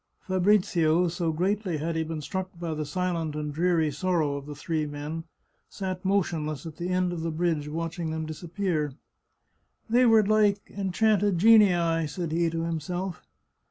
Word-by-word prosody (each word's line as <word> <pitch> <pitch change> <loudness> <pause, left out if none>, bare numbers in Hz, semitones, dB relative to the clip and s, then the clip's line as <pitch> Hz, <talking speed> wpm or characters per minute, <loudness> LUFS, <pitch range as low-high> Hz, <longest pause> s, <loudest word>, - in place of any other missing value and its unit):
Fabrizio, 180 -3 +3
so 170 -1 -1
greatly 185 +1 -1
had 160 +2 -2
he 160 - +1
been 160 -1 -5
struck 185 +5 -4
by 170 -2 -3
the 155 -1 -4
silent 165 -1 -2
and 150 -1 -3
dreary 165 -1 +2
sorrow 155 -1 0
of 140 0 -7
the 145 - -7
three 155 +1 -2
men, 150 +3 -5 0.4
sat 185 -2 -5
motionless 165 -7 -1
at 160 -2 -8
the 175 +1 -3
end 180 -1 +1
of 170 - -4
the 165 - -2
bridge, 160 -2 -1
watching 165 +2 -3
them 160 0 -3
disappear. 160 -2 -2 0.5
" - - -45
They 245 +1 +5
were 220 -2 +6
like 210 -1 +4 0.2
enchanted 205 0 +2
genii," 175 -6 +5
said 165 +1 -4
he 170 +1 +2
to 165 0 -2
himself. 175 +2 -3
170 Hz, 165 wpm, -27 LUFS, 155-185 Hz, 0.5 s, were